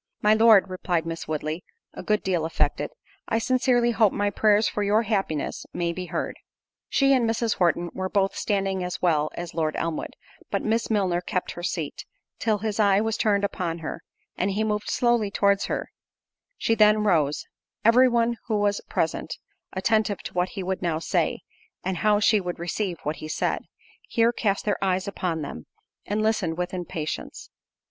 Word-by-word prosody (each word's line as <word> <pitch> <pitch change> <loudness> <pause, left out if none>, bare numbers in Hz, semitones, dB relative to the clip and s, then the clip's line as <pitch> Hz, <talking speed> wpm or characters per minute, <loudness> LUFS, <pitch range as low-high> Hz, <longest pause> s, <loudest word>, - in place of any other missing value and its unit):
"My 210 0 +6
Lord," 220 -3 +6
replied 180 -3 -1
Miss 165 0 -5
Woodley, 155 +2 -3 0.3
a - - -7
good 210 +3 0
deal 180 -4 0
affected, 160 - 0 0.4
"I 225 - +1
sincerely 245 0 +2
hope 220 -3 +4
my 205 0 0
prayers 210 +2 +3
for 210 - -2
your 210 +2 +3
happiness 195 -9 -2
may 170 -1 -1
be 180 +1 -5
heard." 170 0 -3 0.5
She 275 -1 +4
and 240 -4 +3
Mrs. 225 0 0
Horton 175 -1 +1
were 190 0 -3
both 195 -1 +1
standing 195 -2 -1
as 180 0 -4
well 155 -4 +2
as 175 -1 -6
Lord 155 -2 -1
Elmwood; 165 -1 -3 0.4
but - - -1
Miss 225 +1 0
Milner 190 -5 +1
kept 180 0 -2
her 175 - -8
seat, 170 -4 -3 0.4
till 220 -2 +1
his 215 +1 -3
eye 200 -2 +5
was 220 0 0
turned 205 -2 +2
upon 175 -4 -2
her, 165 - -5 0.3
and 190 - 0
he 205 +2 0
moved 210 -1 -1
slowly 240 -4 +2
towards 200 0 +2
her; - - -3 0.7
she 225 - +1
then 215 -1 +5
rose:—every 210 - +2
one 235 0 +1
who 220 -2 +1
was 205 0 +1
present, - - -1 0.4
attentive 210 0 +1
to - - -7
what 180 +1 0
he 190 - -2
would 190 +1 -2
now 170 -3 0
say, 165 - 0 0.4
and 185 0 -2
how 210 +3 +3
she 215 0 +4
would 180 -1 -4
receive 175 +1 -2
what 150 +2 -2
he 155 - -7
said, - - -1 0.5
here 230 +1 +3
cast 200 -4 0
their 205 -2 0
eyes 185 0 0
upon 175 -5 -2
them, 80 - -7 0.4
and 210 +1 0
listened 205 -7 0
with 180 +1 -3
impatience. 170 -3 -5
195 Hz, 180 wpm, -25 LUFS, 175-215 Hz, 0.7 s, My